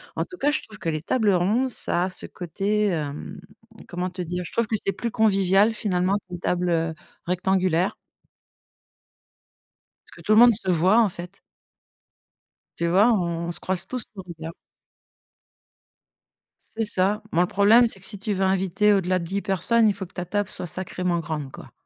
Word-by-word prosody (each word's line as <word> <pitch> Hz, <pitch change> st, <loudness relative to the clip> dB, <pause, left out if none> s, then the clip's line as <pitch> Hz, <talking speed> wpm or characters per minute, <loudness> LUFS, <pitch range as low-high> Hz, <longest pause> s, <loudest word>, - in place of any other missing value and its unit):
En -, -, 0 dB
tout 365 Hz, -, -11 dB
cas, 290 Hz, +2 st, +1 dB
je -, -, -1 dB
trouve 210 Hz, -2 st, -14 dB
que -, -, -6 dB
les 155 Hz, -1 st, -2 dB
tables 215 Hz, +2 st, +1 dB
rondes, 210 Hz, +9 st, +1 dB
ça 180 Hz, -5 st, +3 dB
a -, -, -3 dB
ce 185 Hz, -, -7 dB
côté, 200 Hz, +4 st, -1 dB
mmh, 145 Hz, -1 st, -6 dB, 0.5 s
comment 180 Hz, +1 st, -3 dB
te 180 Hz, 0 st, -7 dB
dire, 180 Hz, +1 st, -4 dB
je -, -, -9 dB
trouve 230 Hz, -2 st, 0 dB
que 220 Hz, -, 0 dB
c'est 195 Hz, -, -1 dB
plus 235 Hz, -2 st, -4 dB
convivial, 200 Hz, 0 st, +3 dB
finalement, 190 Hz, -2 st, 0 dB
qu'une 175 Hz, -1 st, -7 dB
table, 180 Hz, 0 st, -1 dB
heu, 165 Hz, -1 st, 0 dB, 0.3 s
rectangulaire. 185 Hz, 0 st, +1 dB, 2.1 s
Parce -, -, -18 dB
que -, -, -14 dB
tout 215 Hz, -, +2 dB
le 215 Hz, -, +6 dB
monde 240 Hz, -1 st, +8 dB
se 195 Hz, -3 st, -4 dB
voit, 185 Hz, +7 st, +4 dB
en 210 Hz, -, +2 dB
fait. 180 Hz, +2 st, -10 dB, 1.4 s
Tu 170 Hz, -, 0 dB
vois? 200 Hz, +7 st, +4 dB
On 170 Hz, -3 st, -2 dB
se -, -, +1 dB
croise 185 Hz, -1 st, -2 dB
tous 255 Hz, -3 st, -2 dB
du -, -, -10 dB
regard. 165 Hz, -2 st, -9 dB, 2.2 s
C'est 225 Hz, -, 0 dB
ça. 205 Hz, +2 st, 0 dB
Bon, 175 Hz, -, +2 dB
le 180 Hz, -, +2 dB
problème, 220 Hz, +5 st, +5 dB
c'est 195 Hz, -, -3 dB
que 190 Hz, -, -9 dB
si 205 Hz, -1 st, -4 dB
tu 210 Hz, 0 st, -2 dB
veux 190 Hz, 0 st, -1 dB
inviter 190 Hz, +2 st, +2 dB
au-delà 185 Hz, -1 st, +1 dB
de 170 Hz, -, -4 dB
10 195 Hz, +3 st, -3 dB
personnes, 215 Hz, +4 st, +2 dB
il -, -, +1 dB
faut 190 Hz, 0 st, -6 dB
que 180 Hz, -, -19 dB
ta 180 Hz, -1 st, -5 dB
table 205 Hz, +2 st, -2 dB
soit 180 Hz, -, -6 dB
sacrément 180 Hz, 0 st, -3 dB
grande, 150 Hz, -4 st, -4 dB
quoi. -, -, -12 dB
190 Hz, 190 wpm, -24 LUFS, 175-210 Hz, 2.2 s, monde